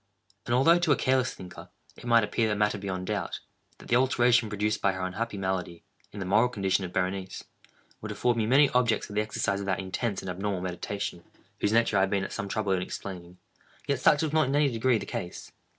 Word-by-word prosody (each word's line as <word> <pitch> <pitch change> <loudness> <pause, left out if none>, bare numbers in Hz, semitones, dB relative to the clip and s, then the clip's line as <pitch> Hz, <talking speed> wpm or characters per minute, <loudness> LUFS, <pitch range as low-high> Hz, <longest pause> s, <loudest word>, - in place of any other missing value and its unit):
And 120 - +2
although, 165 +7 +5
to 175 -3 +1
a - - +6
careless 130 -1 +1
thinker, 90 -1 -11 0.3
it - - -13
might 115 -1 +5
appear 110 +1 0
a - - +1
matter 105 0 +1
beyond 95 -2 -4
doubt, 105 0 -3 0.4
that - - -14
the 120 - +2
alteration 120 -3 +3
produced 105 +1 -1
by 100 - +2
her 95 0 -3
unhappy 105 +4 -4
malady, 95 -3 -3 0.3
in 105 - -8
the 95 - -3
moral 110 +6 +3
condition 100 -4 0
of 90 - -5
Berenice, 95 +1 -3 0.6
would - - -5
afford 120 -1 +1
me 110 -2 0
many 140 +4 +6
objects 120 -3 +2
for 105 - -10
the 105 - +1
exercise 100 -2 -1
of 100 - -5
that 95 - +1
intense 95 +3 -3
and 95 - -5
abnormal 95 0 -3
meditation 90 0 -4 0.4
whose 105 - +1
nature 115 -2 +3
I - - +4
have 95 - +2
been 100 -1 0
at - - -5
some 105 -2 -4
trouble 105 -1 -1
in 95 -1 +1
explaining, 90 -1 -7 0.5
yet 140 -2 0
such 145 +3 +4
was 155 -1 -2
not 155 -4 +3
in 135 - 0
any 145 -2 +3
degree 120 +1 +2
the - - -5
case. 90 - -6
105 Hz, 230 wpm, -28 LUFS, 95-120 Hz, 0.6 s, a